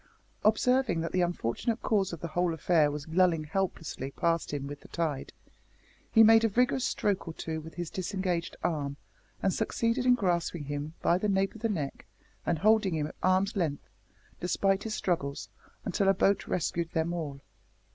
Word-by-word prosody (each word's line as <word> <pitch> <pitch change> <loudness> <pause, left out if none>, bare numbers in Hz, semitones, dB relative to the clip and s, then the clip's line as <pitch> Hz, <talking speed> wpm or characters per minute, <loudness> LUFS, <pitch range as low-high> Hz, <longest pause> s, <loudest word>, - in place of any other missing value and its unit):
Observing 220 -4 +3
that 165 - -3
the 185 - +1
unfortunate 175 - -1
cause 200 -4 +1
of 170 - -7
the 170 - -4
whole 175 +1 0
affair 160 -1 +3
was 145 0 -5
lulling 170 -2 +3
helplessly 160 -5 -3
past 165 +3 0
him 145 -2 -3
with 145 +1 -7
the - - -14
tide, 155 -5 -2 0.8
he 225 - +7
made 225 +1 +7
a 225 - +3
vigorous 250 +4 +2
stroke 200 -7 0
or 165 - -6
two 160 -1 -4
with 160 +1 -11
his 175 -2 -4
disengaged 185 -2 -2
arm, 145 -5 -1 0.5
and 190 - +2
succeeded 230 +3 0
in 250 - +7
grasping 175 -6 0
him 145 +2 -5
by 175 - +3
the 210 - 0
nape 195 0 +1
of 225 - -12
the 230 - 0
neck, 150 -9 -4 0.4
and 170 - +2
holding 210 0 +3
him 150 -1 0
at 150 - -8
arm's 185 +3 +2
length, 160 -7 -1 0.5
despite 195 +2 +1
his 220 -1 -3
struggles, 140 -6 -2 0.4
until 195 +2 +1
a 195 - +5
boat 195 +1 +2
rescued 170 -1 -1
them 165 +1 0
all. 150 -5 -4
175 Hz, 180 wpm, -29 LUFS, 160-200 Hz, 0.8 s, he